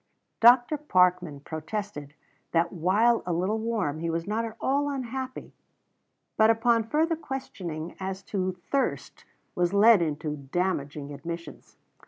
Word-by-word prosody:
Dr. 245 +5 +6
Parkman 180 - +2
protested 160 -1 -6 0.4
that 170 +2 +2
while 205 +7 +3
a 180 - -3
little 185 +6 0
warm, 215 -10 -2
he 165 +1 -2
was 165 0 -2
not 215 +3 -1
at 225 -1 -7
all 285 +2 +1
unhappy, 260 -1 -5 0.8
but 220 0 +5
upon 225 0 +2
further 320 +4 +2
questioning 175 - -6
as 190 0 -5
to 185 -2 -2 0.2
thirst 275 -1 -2 0.3
was 180 +2 0
led 215 -1 +7
into 150 -1 -2
damaging 145 -1 -3
admissions. 170 +3 -8
190 Hz, 130 wpm, -27 LUFS, 165-230 Hz, 0.8 s, led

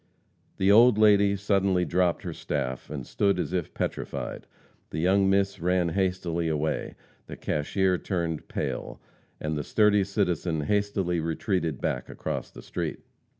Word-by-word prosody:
The 95 +1 +4
old 115 +1 +7
lady 100 -2 +5
suddenly 95 -2 +1
dropped 90 -1 +1
her - - -4
staff 65 0 -3
and 70 -4 -5
stood 100 +6 +1
as 90 - -2
if 90 -4 -2
petrified; - - -4 0.4
the - - -6
young 95 +4 +3
miss 100 0 +1
ran 90 0 +1
hastily 90 -2 -1
away; 75 0 -1 0.3
the - - -7
cashier 90 +5 0
turned 85 -5 -3
pale, - - -4 0.4
and 75 0 -2
the 75 - -2
sturdy 105 +1 +3
citizen 90 -5 -1
hastily 95 0 0
retreated 80 - -1
back 65 - -2
across - - -4
the - - -12
street. - - -4
90 Hz, 145 wpm, -27 LUFS, 80-100 Hz, 0.4 s, old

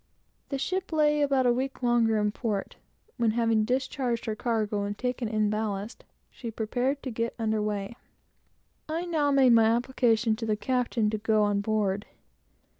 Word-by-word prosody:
The 275 - -2
ship 370 +7 -2
lay 300 -1 +3
about 275 -3 +2
a 245 - +4
week 260 +1 -3
longer 235 -2 +3
in 210 0 +1
port, 210 -3 -3 0.4
when, 235 -2 +2
having 225 -1 +2
discharged 255 -1 -1
her 220 - -2
cargo 215 -3 -1
and 205 0 -4
taken 250 -1 -2
in 215 -1 +1
ballast, 215 0 -3 0.3
she 235 - -7
prepared 245 +5 -2
to 260 - -4
get 230 +1 -2
under 220 -2 0
weigh. 210 +1 -3 0.9
I 330 +3 -2
now 310 -4 +1
made 270 -3 +5
my 225 -1 +6
application 235 -1 +2
to 230 - -4
the 215 - +2
captain 240 -3 0
to 215 - -2
go 215 0 +2
on 205 -1 +1
board. 205 -1 -1
230 Hz, 170 wpm, -27 LUFS, 215-255 Hz, 0.9 s, my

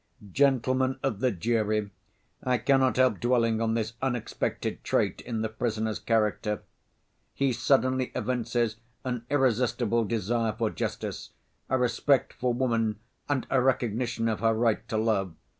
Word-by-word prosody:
"Gentlemen 130 0 +2
of 120 -7 -1
the 130 - +2
jury, 110 0 0 0.5
I 125 -1 +2
cannot 130 +2 +3
help 130 0 +3
dwelling 115 -2 +2
on 115 0 +1
this 115 0 -2
unexpected 125 -4 -2
trait - - 0
in 115 -2 -3
the - - +1
prisoner's 110 -1 -2
character. 105 -1 0 0.7
He 135 -2 +1
suddenly 130 +1 +2
evinces 120 -1 -1 0.3
an 125 -2 -3
irresistible 120 -4 +2
desire 115 +1 0
for 110 0 -1
justice, - - -4 0.4
a 130 - +2
respect 125 +2 +2
for 125 0 -1
woman 115 -4 0 0.3
and 145 -3 0
a 130 - +4
recognition 120 -2 0
of 110 -2 -1
her 115 -1 +2
right 115 -1 +1
to 110 - -1
love. 100 -6 0
120 Hz, 140 wpm, -28 LUFS, 110-130 Hz, 0.7 s, a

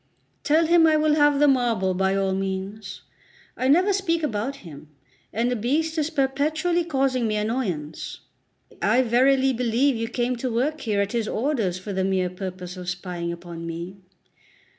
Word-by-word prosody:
Tell 315 +3 +3
him 330 0 +5
I 310 -1 +4
will 305 0 +3
have 290 -1 +4
the 295 - +5
marble 235 -8 +2
by 190 +1 +1
all 195 -1 0
means. 195 +2 -4 0.5
I 255 - -1
never 360 +8 +4
speak 335 -4 0
about 250 0 -2
him, 150 -2 -11 0.4
and 235 +3 0
the - - +1
beast 300 +8 0
is 305 0 0
perpetually 310 +4 0
causing 265 -6 0
me 215 - -1
annoyance. 210 - -3 0.6
I 230 +6 +3
verily 260 +3 +3
believe 250 +3 +1
you 230 0 -2
came 245 +1 -1
to 250 +1 -3
work 285 +7 -1
here 205 -3 0
at 200 0 -2
his 230 -2 -1
orders 225 -8 -1
for 195 +2 -6
the 190 0 0
mere 185 -2 0
purpose 185 -1 -7
of 180 -1 -5
spying 180 -1 -4
upon 170 -1 -8
me. 170 +3 -6
235 Hz, 170 wpm, -24 LUFS, 190-285 Hz, 0.6 s, him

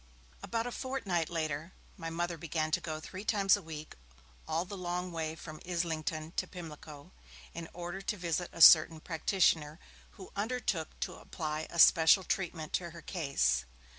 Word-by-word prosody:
About 230 0 -2
a 245 - -3
fortnight 225 - -2
later, 160 0 -3 0.2
my 165 - -5
Mother 175 +1 -2
began 155 0 -2
to 175 - +1
go 155 -2 -4
three 185 +5 -8
times 200 -3 +4
a 205 - -6
week 155 -2 -8 0.5
all 160 +3 0
the 200 - -7
long 180 0 -3
way 160 -1 -3
from 155 -1 -10
Islington 160 -2 -2
to - - 0
Pimlico, 155 -4 -10 0.4
in 165 -1 -7
order 175 +2 -6
to 210 +2 -2
visit 175 0 -2
a 170 - -7
certain 160 0 +9
practitioner, 160 -2 +1 0.4
who 190 - -11
undertook 210 -6 -2
to - - -3
apply 155 -1 -4
a 170 - -7
special 165 +3 +7
treatment 170 -5 -3
to 175 -2 -1
her 170 0 -11
case. 100 - +1
170 Hz, 165 wpm, -32 LUFS, 155-185 Hz, 0.5 s, certain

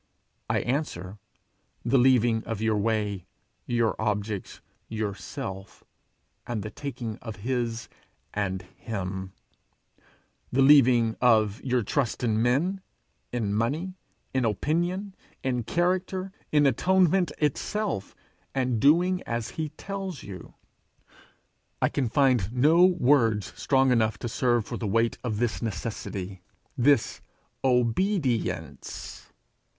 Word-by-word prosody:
I - - +2
answer, 110 - -3 0.7
The 130 +2 +4
leaving 120 -3 +4
of 115 -3 -3
your 110 0 +1
way, 105 -3 -1 0.4
your 120 -2 +1
objects, 105 -2 -2 0.3
your 110 -2 -2
self, 95 0 -7 0.6
and 115 -4 -3
the 110 - -6
taking 120 -6 -5
of 110 -3 -7
his 120 -3 -1 0.5
and 95 -2 -2
him; 95 -3 -5 1.2
the 135 +2 +4
leaving 125 -5 +6
of 110 -2 +3
your 125 -3 +1
trust 125 +2 -1
in 110 -2 +2
men, 155 +11 +1 0.5
in 110 -4 -1
money, 145 - -1 0.4
in 130 -1 +1
opinion, 175 - -1 0.3
in 125 -2 0
character, 185 +5 0 0.2
in 150 -1 +4
atonement 180 +5 +3
itself, 155 - -1 0.4
and 125 -3 +1
doing 175 +8 +4
as 115 -1 -2
he 155 -1 -4
tells 190 +1 -6
you. 95 -3 -10 1.2
I - - +2
can 130 -5 -1
find 125 -6 +3
no 155 +8 +5
words 125 - +3
strong 135 -1 +3
enough 110 -3 +2
to - - -4
serve 120 -1 +1
for - - -5
the 110 - -3
weight 115 +3 +1
of 110 -4 -2
this 120 0 -1
necessity 100 -4 -4 0.3
this 135 0 +2 0.4
obedience. 125 - -1
120 Hz, 115 wpm, -27 LUFS, 110-145 Hz, 1.2 s, leaving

